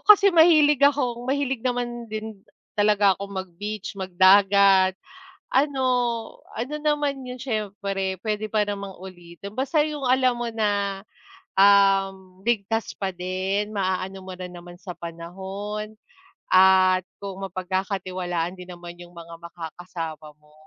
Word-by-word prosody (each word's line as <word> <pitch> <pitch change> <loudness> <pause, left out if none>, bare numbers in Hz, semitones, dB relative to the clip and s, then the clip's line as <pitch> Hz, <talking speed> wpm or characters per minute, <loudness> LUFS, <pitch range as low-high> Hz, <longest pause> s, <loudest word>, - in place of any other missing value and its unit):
kasi 405 -1 +8
mahilig 305 -4 +6
akong 255 -4 +2
mahilig 270 -3 -1
naman 240 -2 -3
din 215 -2 -6 0.3
talaga 205 -2 +4
akong 200 +1 -8
mag-beach, 200 +3 -6
magdagat. 190 +1 +5 0.6
Ano, 270 -1 +2 0.7
ano 255 +6 -4
naman 290 -3 0
'yon, 250 0 -7
siyempre 200 -5 -3
puwede 215 0 -2
pa 215 0 +2
namang 200 -2 -5
ulitin 185 +1 -11
basta 275 +3 +1
'yung 300 -2 -5
alam 255 -1 +3
mo 240 - -2
na, 200 -3 -1 0.6
um, 195 -1 +4
ligtas 225 -1 0
pa 195 -1 -2
din. 190 +3 -2
Maaano 190 0 -2
mo 190 - -8
rin 180 -1 -8
naman 175 0 -11
sa 180 -3 -7
panahon 190 +5 -6 0.6
at 185 0 +5 0.2
kung 195 -1 -7
mapagkakatiwalaan 185 -1 -3
din 180 0 -11
naman 175 0 -10
'yung 175 0 -12
mga 170 0 -10
makakasama 165 -2 -7
mo. 150 0 -25
195 Hz, 125 wpm, -24 LUFS, 185-225 Hz, 0.7 s, kasi